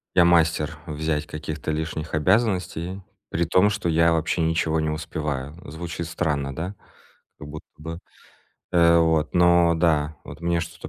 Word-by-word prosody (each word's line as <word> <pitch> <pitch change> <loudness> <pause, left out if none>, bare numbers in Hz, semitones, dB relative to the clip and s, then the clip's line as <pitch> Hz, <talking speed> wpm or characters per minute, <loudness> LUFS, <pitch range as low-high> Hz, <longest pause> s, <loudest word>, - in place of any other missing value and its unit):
Я- 90 - +6
мастер 80 -3 +2
взять 75 -1 -2
каких-то 75 0 -5
лишних 80 +1 -3
обязанностей, 95 0 0 0.3
при 85 - 0
том 90 +5 +4
что 100 -4 -2
я 85 +1 +4
вообще 80 +2 0
ничего 80 -1 +1
не 80 - -1
успеваю. 75 -2 -4 0.2
Звучит 85 +1 -5
странно, 75 -5 -2
да? 90 +5 -4 0.6
Как 75 - -9
будто 75 +1 -9
бы, 80 +2 -6 0.7
э, 85 -1 +5
вот. 80 -1 +2
Но 85 -1 +5
да, 80 -2 +1
вот - - -10
мне 85 0 0
что-то 85 +2 -8
80 Hz, 150 wpm, -24 LUFS, 75-85 Hz, 0.7 s, Я